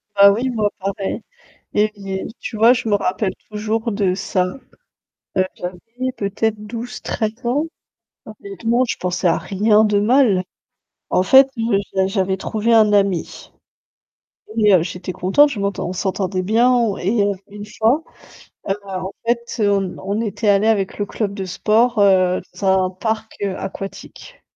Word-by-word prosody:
Bah 200 0 +8
oui, 240 +6 -1
moi, 215 -4 0
pareil, 195 +1 -3 0.5
et 210 +1 +2
yé 195 -1 -5
tu - - -6
vois? 225 +3 +6
Je 230 -2 -1
me 210 - +2
rappelle 190 0 0 0.2
toujours 220 +2 -2
de 200 -3 +1
ça, 185 -1 0 0.9
heu, 185 - +3
j'avais 180 0 -6 0.4
peut-être 210 +2 -1
12-13 225 -1 -4
ans. 275 +6 +1 0.6
Honnêtement, 215 +3 -1
je - - -1
pensais 180 0 -2
à 165 - +2
rien 210 +2 +3
de 210 -1 +2
mal. 215 -4 +3 0.7
En 185 - +2
fait, 265 +7 +7 0.4
j'a 190 0 +2
j'avais 190 -1 0
trouvé 220 +3 0
un 215 -2 +5
ami, 195 -4 0 1.1
et 210 -3 +5
heu, 175 - +5
j'étais 180 +1 -5
contente, 195 +13 +3
je 220 - -4
m'entend 200 -3 -2
on - - -3
s'entendait 185 0 -2
bien 225 +6 +3
on 235 -5 +2
et 205 +4 +1
heu, 200 - +1 0.2
une 205 0 -9
fois, 225 +8 +1 0.7
heu, 195 - +2
en 190 -1 -5
fait, 235 0 -1
on 195 -2 +1
on 200 +3 -2
était 215 -1 -1
allés 200 +2 +4
avec 200 -4 +1
le 205 - 0
club 205 0 -3
de 195 -2 -5
sport, 220 +5 +1
heu, 185 -2 +4 0.2
dans 200 - -3 0.2
un - - -2
parc, 220 +4 -3
heu, 195 -2 -1
aquatique. 195 - -8
205 Hz, 160 wpm, -20 LUFS, 190-225 Hz, 1.1 s, Bah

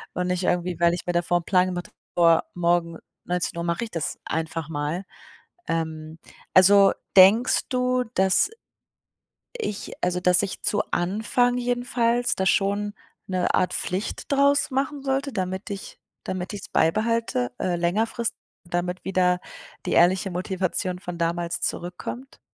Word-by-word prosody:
und 180 - -1
nicht 180 0 -1
irgendwie, 175 -1 0
weil 170 0 +4
ich 175 - -7
mir 175 - -1
davor 175 0 +2
'n - - -18
Plan 185 0 +3
gemacht 180 -1 -4
habe, - - -35 0.2
vor 165 -1 +5
morgen 170 -1 +1 0.3
19:00 175 -1 -2
mache 170 +5 -1
ich 225 - -6
das 165 -3 -3
einfach 160 0 -3
mal. 160 +4 -3 0.6
Ähm, 160 -1 -3 0.4
also 195 +1 +7 0.3
denkst 210 +7 +6
du, 250 0 +1
dass 190 - +3 1.1
ich 210 - -4
also, 180 0 0
dass 180 0 +4
ich 195 - -4
zu 205 0 +1
Anfang 220 +7 +1
jedenfalls 245 -1 0
da 190 - -1
schon 205 +1 +1 0.3
'ne 185 -1 0
Art 180 - +1
Pflicht 190 +9 -3
draus 280 +1 +3
machen 275 +1 -2
sollte, 270 0 -1
damit 190 +1 -3
ich 200 -1 -7 0.3
damit 185 0 -4
ich 205 - -6
es 205 - -10
beibehalte, 215 - +1
äh, 180 -2 0
längerfristig, 220 +7 0 0.3
damit 180 +1 -2
wieder 180 -1 +2 0.5
die - - -1
ehrliche 185 +3 +4
Motivation 185 0 -2
von 180 -3 -6
damals 170 0 -1
zurückkommt? 180 +9 -5
185 Hz, 145 wpm, -24 LUFS, 175-220 Hz, 1.1 s, also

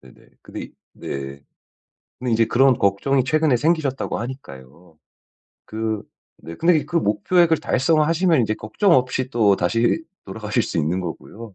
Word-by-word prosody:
네네. 65 - -19
근데 - - -9
이 - - -11 0.2
네. 70 0 -7 0.8
근데 125 -1 -2
이제 115 0 +3
그런 130 +2 +3
걱정이 120 +7 +1
최근에 155 0 +2
생기셨다고 150 -1 -1
하니까요. 85 - -10 0.7
그 110 -1 -3 0.4
네 85 - -8
근데 170 +1 +3
이 - - -5
그 170 - -3
목표액을 165 - +2
달성하시면 160 +3 +2
이제 110 -1 -1
걱정 110 - 0
없이 130 -1 +1
또다시 115 - +2 0.2
돌아가실 105 +3 -2
수 - - -5
있는 80 +5 0
거고요. 100 +5 -8
120 Hz, 315 characters per minute, -21 LUFS, 100-150 Hz, 0.8 s, 이제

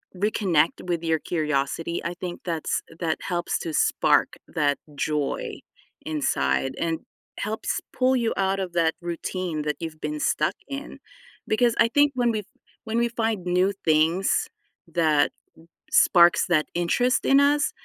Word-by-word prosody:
reconnect 180 -5 +1
with 170 -2 -2
your 160 -1 +1
curiosity, 155 +1 -1
I 170 - -3
think 175 -1 -6
that's 165 -3 -2 0.2
that 165 -2 -1
helps 175 -1 -1
to 160 - -5
spark - - +3 0.2
that 145 -2 +1 0.2
joy 150 0 -2 0.5
inside 135 - 0
and 165 -1 -1 0.4
helps 215 +2 -2
pull 260 +1 +2
you 235 -2 +1
out 195 0 0
of 180 -2 -4
that 165 -2 +2
routine 170 -1 -3
that 150 -1 -1
you've 160 -2 -7
been 150 0 -3
stuck 155 - +1
in, 280 +1 -7 0.5
because 235 +2 +3
I 230 - +6
think 290 0 +4
when 240 -2 +2
we 215 - -1
f 210 - -8 0.4
when 225 0 -2
we 235 0 +3
find 225 -5 -2
new 180 +2 +2
things 165 +4 +2 0.5
that 155 -3 +3 0.6
sparks 170 -1 +5
that 155 -3 +3
interest 245 +9 +1
in 275 - +5
us, 290 +1 +3
175 Hz, 150 wpm, -25 LUFS, 155-215 Hz, 0.6 s, I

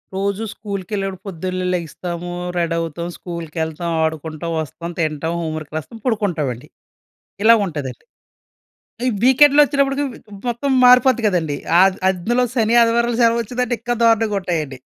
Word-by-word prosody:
రోజు 200 +2 -1
స్కూల్‌కెళ్ళేటప్పుడు 195 -2 -5
పొద్దున్నే 185 +1 -3
లెగి‌స్తాము, 175 +1 -4 0.3
రెడవుతాం. 165 0 -2
స్కూల్‌కెళ్తాం, 165 -1 -4
ఆడుకుంటాం, 160 +1 -3
వస్తాం, 170 +3 -6
తింటాం, 160 +1 -1
హోమ్ 160 -1 -3
వర్క్ 155 -1 -9
రాస్తాం, 225 +9 -8
పడుకుంటామండి. 165 - -1 0.8
ఇలాగుం‌టదండి. 190 - +2 1.0
ఈ - - +3
వీకెండ్ 275 +3 +6
వచ్చేటప్పటికి 280 0 +1 0.4
మొత్తం 240 +4 -1
మారిపోద్ది 250 -1 +6
కదండీ. 165 -7 0 0.2
ఆద్ 190 0 +4
అందులో 220 +7 0
శని, 230 -1 +1
ఆదివారం 235 +1 +2
సెలవు 230 0 +4
వచ్చిందంటే 250 +2 -2
ఇంకా 240 0 -1
దారుణంగుంటా‌యండి. 195 - +1
185 Hz, 115 wpm, -19 LUFS, 165-230 Hz, 1.0 s, వీకెండ్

